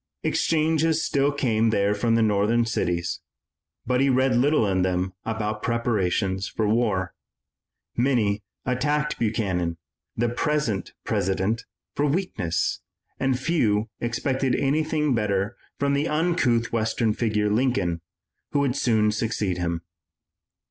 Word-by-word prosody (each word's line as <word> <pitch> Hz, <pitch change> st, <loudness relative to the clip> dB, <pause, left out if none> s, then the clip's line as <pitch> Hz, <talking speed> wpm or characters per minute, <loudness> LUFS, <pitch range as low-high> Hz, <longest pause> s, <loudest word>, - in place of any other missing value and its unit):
Exchanges 160 Hz, 0 st, +1 dB
still 140 Hz, 0 st, +2 dB
came 115 Hz, -6 st, +1 dB
there 100 Hz, -1 st, +2 dB
from 115 Hz, +2 st, +1 dB
the 115 Hz, -, +3 dB
northern 110 Hz, +3 st, +2 dB
cities, 85 Hz, -7 st, -1 dB, 0.7 s
but 125 Hz, +1 st, +1 dB
he 140 Hz, -, +3 dB
read 130 Hz, 0 st, +3 dB
little 135 Hz, 0 st, +3 dB
in 95 Hz, -1 st, +1 dB
them 90 Hz, 0 st, 0 dB
about 110 Hz, -1 st, -2 dB
preparations 100 Hz, -5 st, 0 dB
for 110 Hz, -, -1 dB
war. 105 Hz, -5 st, +1 dB, 0.8 s
Many 115 Hz, -5 st, +1 dB, 0.2 s
attacked 150 Hz, +4 st, 0 dB
Buchanan, 95 Hz, -7 st, -1 dB, 0.4 s
the 120 Hz, +1 st, +2 dB
present 120 Hz, -, -1 dB
President, 95 Hz, +6 st, 0 dB, 0.3 s
for 145 Hz, -, +1 dB
weakness, 135 Hz, -, -1 dB, 0.4 s
and 135 Hz, -2 st, +1 dB
few 115 Hz, -9 st, +1 dB
expected 130 Hz, +2 st, 0 dB
anything 150 Hz, +1 st, +1 dB
better 105 Hz, -1 st, 0 dB, 0.2 s
from 140 Hz, 0 st, +1 dB
the 140 Hz, +3 st, +1 dB
uncouth 150 Hz, -8 st, +1 dB
western 110 Hz, 0 st, +1 dB
figure, 105 Hz, -2 st, 0 dB
Lincoln, 100 Hz, -8 st, +1 dB, 0.5 s
who 145 Hz, -, +3 dB
would 135 Hz, -3 st, +1 dB
soon 110 Hz, -5 st, +2 dB
succeed 105 Hz, -4 st, -1 dB
him. 85 Hz, -1 st, -2 dB
115 Hz, 120 wpm, -25 LUFS, 100-135 Hz, 0.8 s, the